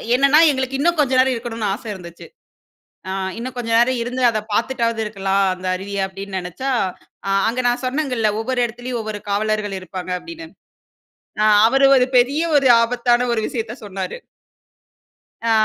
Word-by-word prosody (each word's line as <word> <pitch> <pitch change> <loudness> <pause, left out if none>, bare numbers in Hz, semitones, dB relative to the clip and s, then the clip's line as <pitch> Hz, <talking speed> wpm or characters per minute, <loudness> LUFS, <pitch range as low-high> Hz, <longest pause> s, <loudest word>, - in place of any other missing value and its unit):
என்னென்னா 275 +3 +5
எங்களுக்கு 265 -1 -2
இன்னும் 340 +3 +2
கொஞ்சம் 260 -3 +3
நேரம் 260 0 +4
இருக்கணும்னு 225 -3 -4
ஆசை 225 +2 -8
இருந்துச்சு. 170 -3 -11 0.8
ஆ 190 - -3 0.3
இன்னும் 255 +2 -6
கொஞ்சம் 230 -2 0
நேரம் 245 +1 +3
இருந்து 250 +2 -3
அத 225 -2 0
பார்த்துட்டாவது 230 0 0
இருக்கலாம் 195 -2 0
அந்த 185 0 -8
அருவிய, 200 +1 -4
அப்படின்னு 195 0 -6
நினைச்சா, 180 +10 -5 0.6
அ - - 0 0.2
அங்க 245 +3 -1
நான் 245 +2 -1
சொன்னேங்கல்ல 255 -5 0
ஒவ்வொரு 250 +2 -1
இடத்திலேயும் 240 +1 -5
ஒவ்வொரு 215 -1 -5
காவலர்கள் 210 0 -1
இருப்பாங்க 185 0 -7
அப்படின்னு. 330 - -10 1.0
ஆ. - - +4 0.2
அவரு 270 +3 +3
ஒரு 250 -1 +4
பெரிய 270 +5 +3 0.2
ஒரு 275 -2 +3
ஆபத்தான 240 +1 +1
ஒரு 230 - 0
விஷயத்த 225 -1 -4
சொன்னாரு. 195 - -5 1.3
ஆ - - +3
235 Hz, 155 wpm, -20 LUFS, 205-255 Hz, 1.3 s, என்னென்னா